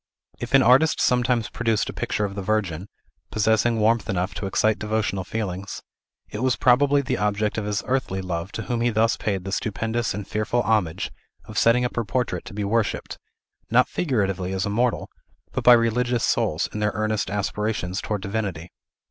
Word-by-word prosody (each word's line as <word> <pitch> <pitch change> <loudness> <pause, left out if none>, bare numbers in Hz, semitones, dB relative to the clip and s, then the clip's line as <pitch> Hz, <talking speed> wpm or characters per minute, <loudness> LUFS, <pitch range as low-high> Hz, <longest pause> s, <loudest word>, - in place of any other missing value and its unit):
If 120 +3 0
an 135 - +6
artist 135 +6 +5
sometimes 125 -3 +2
produced 110 0 0
a - - -5
picture 105 - -1
of 100 - -5
the 100 - -4
Virgin, 95 -3 -1 0.4
possessing 110 +2 +2
warmth 115 +2 +2
enough 90 0 -1
to 100 - -4
excite 110 +2 +1
devotional 105 -3 -1
feelings, 100 -2 -5 0.4
it 105 - -6
was 130 -1 +2
probably 140 +3 +4
the - - -2
object 105 0 0
of 105 - -4
his 105 0 -1
earthly 125 -7 -1
love 90 0 -4
to 115 - -4
whom 120 -2 -2
he 120 - +3
thus 115 0 +2
paid 95 -3 -2
the 95 - -5
stupendous 110 +2 -1
and 100 -1 -6
fearful 110 +3 0
homage 105 -8 0 0.3
of 110 - -10
setting 120 +3 +4
up 125 - -4
her 120 - +1
portrait 125 +3 -2
to 120 - -9
be 105 - -2
worshipped, 110 +2 -1 0.5
not - - +4
figuratively 95 - -1
as 95 -1 -1
a 105 - -2
mortal, 120 +3 0 0.4
but - - -3
by 125 - +9
religious 120 +1 +2
souls 80 +2 +1
in 105 - -4
their 105 0 0
earnest 110 -2 -1
aspirations 105 -1 -2
towards 105 -3 -3
Divinity. 100 -5 -3
110 Hz, 185 wpm, -24 LUFS, 100-120 Hz, 0.5 s, by